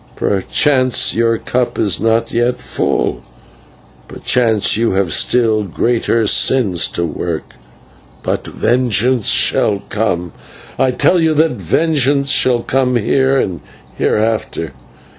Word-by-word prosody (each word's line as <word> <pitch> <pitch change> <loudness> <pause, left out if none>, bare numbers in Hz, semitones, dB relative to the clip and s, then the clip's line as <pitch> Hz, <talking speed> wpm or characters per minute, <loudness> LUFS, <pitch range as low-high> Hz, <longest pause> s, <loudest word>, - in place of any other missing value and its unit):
Perchance 130 +6 +1
your 115 0 +1
cup 125 +1 -2
is 100 -5 0
not 115 +1 0
yet 120 +1 0
full; - - -2 0.9
perchance 115 -4 +1
you 115 -1 0
have 95 -4 0
still 115 -3 +2
greater 115 +3 0
sins 100 -5 +2
to 85 - -3
work: 80 +1 -5 0.7
but - - -3
vengeance 120 -1 0
shall 100 -2 +1
come 90 -6 -2 0.5
I 130 - +3
tell 170 +7 +2
you 160 -1 +1
that 160 +2 +2
vengeance 140 -3 0
shall 120 -2 +2
come 130 -1 0
here 135 +4 +1
and 90 - -2 0.3
hereafter. 110 -8 -1
115 Hz, 115 wpm, -15 LUFS, 105-130 Hz, 0.9 s, I